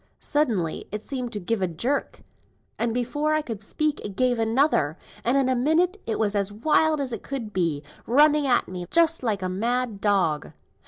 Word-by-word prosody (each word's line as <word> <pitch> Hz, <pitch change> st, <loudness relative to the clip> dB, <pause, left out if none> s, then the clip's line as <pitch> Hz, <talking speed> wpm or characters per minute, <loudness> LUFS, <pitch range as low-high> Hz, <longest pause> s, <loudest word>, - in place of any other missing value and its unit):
Suddenly 225 Hz, -, -1 dB
it 210 Hz, +1 st, -4 dB
seemed 255 Hz, -4 st, -4 dB
to 210 Hz, -, -3 dB
give 210 Hz, +3 st, -2 dB
a 185 Hz, -, +2 dB
jerk, 235 Hz, -, -2 dB, 0.6 s
and 235 Hz, -, +1 dB
before 290 Hz, +6 st, 0 dB
I 310 Hz, -, 0 dB
could 225 Hz, -7 st, -6 dB
speak, 305 Hz, +7 st, -1 dB
it 200 Hz, -2 st, -6 dB
gave 250 Hz, +1 st, +1 dB
another, 225 Hz, -, +2 dB, 0.3 s
and 245 Hz, +4 st, +2 dB
in 270 Hz, -2 st, +2 dB
a 260 Hz, -, +2 dB
minute 335 Hz, +10 st, +2 dB
it 225 Hz, -, -1 dB
was 210 Hz, -2 st, +1 dB
as 200 Hz, -1 st, 0 dB
wild 305 Hz, +7 st, +2 dB
as 265 Hz, -4 st, -3 dB
could 240 Hz, -7 st, -5 dB
be, 165 Hz, -5 st, 0 dB, 0.2 s
running 295 Hz, +3 st, +4 dB
at 245 Hz, -2 st, +2 dB
me 180 Hz, -1 st, -6 dB
just 330 Hz, -1 st, +3 dB
like 210 Hz, -6 st, -1 dB
a -, -, 0 dB
mad 230 Hz, +3 st, -1 dB
dog." 185 Hz, -8 st, +1 dB
235 Hz, 190 wpm, -25 LUFS, 200-285 Hz, 0.6 s, running